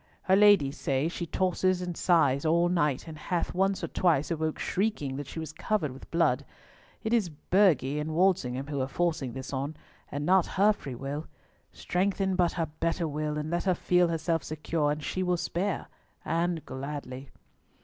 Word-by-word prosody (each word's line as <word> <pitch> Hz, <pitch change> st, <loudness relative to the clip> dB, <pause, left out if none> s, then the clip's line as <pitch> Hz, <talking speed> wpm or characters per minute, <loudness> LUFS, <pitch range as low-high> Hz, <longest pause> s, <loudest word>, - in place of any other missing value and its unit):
Her 190 Hz, -, +4 dB
ladies 195 Hz, -9 st, +5 dB
say 135 Hz, +2 st, 0 dB
she 170 Hz, 0 st, -5 dB
tosses 185 Hz, +1 st, +1 dB
and 180 Hz, -1 st, -4 dB
sighs 145 Hz, -7 st, +3 dB
all 170 Hz, +2 st, +3 dB
night, 150 Hz, -7 st, 0 dB
and 160 Hz, -, -7 dB
hath 175 Hz, +3 st, -2 dB
once 195 Hz, +1 st, +1 dB
or -, -, 0 dB
twice 165 Hz, -4 st, +1 dB
awoke 160 Hz, -1 st, -1 dB
shrieking 185 Hz, -10 st, -1 dB
that 145 Hz, -1 st, -5 dB
she -, -, -9 dB
was 160 Hz, -1 st, -5 dB
covered 160 Hz, -4 st, -1 dB
with 130 Hz, -, -12 dB
blood. 145 Hz, -6 st, +2 dB, 0.6 s
It 220 Hz, -, -1 dB
is 215 Hz, -7 st, +2 dB
Burghley 150 Hz, -4 st, +2 dB
and 155 Hz, +1 st, -3 dB
Walsingham 160 Hz, -8 st, +2 dB
who 140 Hz, -2 st, -3 dB
are 130 Hz, -, -1 dB
forcing 150 Hz, -4 st, -1 dB
this 130 Hz, +2 st, -7 dB
on, 140 Hz, +3 st, -3 dB, 0.3 s
and 145 Hz, +1 st, -3 dB
not 185 Hz, +1 st, +4 dB
her 205 Hz, +2 st, +5 dB
free 135 Hz, -10 st, -8 dB
will. 140 Hz, +5 st, -5 dB, 0.4 s
Strengthen 190 Hz, +1 st, 0 dB
but 175 Hz, -2 st, +2 dB
her 165 Hz, -, 0 dB
better 165 Hz, +2 st, -2 dB
will, 150 Hz, 0 st, -2 dB
and 150 Hz, +1 st, -3 dB
let 175 Hz, +2 st, -1 dB
her 185 Hz, -2 st, +3 dB
feel 180 Hz, +1 st, +3 dB
herself 165 Hz, 0 st, -1 dB
secure, 155 Hz, 0 st, -1 dB
and 150 Hz, 0 st, -3 dB
she 185 Hz, -, -2 dB
will 180 Hz, -1 st, +1 dB
spare, 180 Hz, +3 st, -2 dB, 0.4 s
and 165 Hz, 0 st, -1 dB
gladly." 135 Hz, -1 st, -6 dB
165 Hz, 180 wpm, -28 LUFS, 145-180 Hz, 0.6 s, ladies